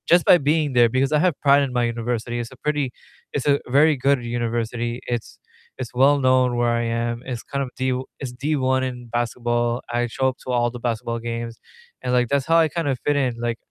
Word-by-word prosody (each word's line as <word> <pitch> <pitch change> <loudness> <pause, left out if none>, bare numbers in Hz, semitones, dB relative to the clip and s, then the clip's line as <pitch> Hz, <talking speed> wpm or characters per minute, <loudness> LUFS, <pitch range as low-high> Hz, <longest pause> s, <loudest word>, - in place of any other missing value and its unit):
Just 175 0 +5
by - - +8
being 150 -1 +1
there, 120 -1 +5
because 130 +4 +1
I 150 - +3
have 175 -2 +1
pride 140 0 +5
in 135 -3 -2
my 125 -1 +1
university, 120 0 -2
it's 120 +1 -5
a 130 - -14
pretty 145 -3 -1 0.4
it's 140 - -2
a 140 0 +4
very 145 +5 +4
good 135 -1 +1
university, 120 0 -2
it's 120 -2 -4 0.4
it's 130 -3 -6
well 140 +3 +4
known 130 -2 +3
where 120 0 +2
I 120 0 +1
am, 115 0 -2
it's 125 -3 -5
kind 140 0 -3
of 130 - -6
D 130 0 0 0.3
it's 130 -3 -5
D1 130 -1 0
in 125 -2 -5
basketball, 120 0 -1
I 120 0 0
show 130 +3 0
up 130 - -7
to 130 - -3
all 120 -1 +1
the 120 - -8
basketball 115 0 -2
games, 115 0 -5 0.4
and, 125 - -2
like, 125 -1 +3
that's 140 -2 +1
how 165 +1 +4
I 165 -1 +5
kind 165 0 -3
of 135 -2 0
fit 145 - +2
in, 130 -4 0
like, 120 -1 -2
125 Hz, 230 wpm, -22 LUFS, 120-140 Hz, 0.4 s, by